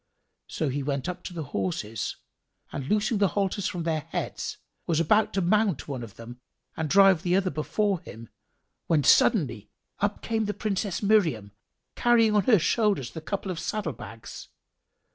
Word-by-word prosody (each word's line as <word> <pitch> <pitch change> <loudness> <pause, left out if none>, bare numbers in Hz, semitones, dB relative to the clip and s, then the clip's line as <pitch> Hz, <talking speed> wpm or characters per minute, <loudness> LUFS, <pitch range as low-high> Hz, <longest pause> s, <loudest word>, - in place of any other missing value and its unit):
So 155 - -2
he 140 +2 -2
went 140 -1 -2
up 180 0 -4
to - - -5
the 165 -2 -4
horses 100 +3 -2 0.6
and 135 -2 -5
loosing 210 +2 +1
the 200 - +4
halters 195 0 0
from 175 -2 -4
their 160 -1 0
heads, 145 - -4 0.3
was 165 -2 +1
about 210 +6 +3
to 195 - +1
mount 200 -2 +1
one 135 -4 -4
of 115 -4 -9
them 120 +2 -10 0.4
and 160 -2 -2
drive 195 0 +6
the 180 0 +1
other 190 -1 +1
before 190 +6 0
him, 115 - -11 0.6
when 155 -3 +3
suddenly 120 - +3 0.3
up 205 0 -1
came 225 -1 0
the 210 - -3
Princess 200 -2 -2
Miriam, 165 - +2 0.4
carrying 230 -3 +4
on 205 - +3
her 230 -4 +6
shoulders 195 - +1
the 160 - -7
couple 195 +3 -3
of 170 - -5
saddle 200 -8 -3
bags. 115 -1 -10
175 Hz, 170 wpm, -27 LUFS, 140-205 Hz, 0.6 s, drive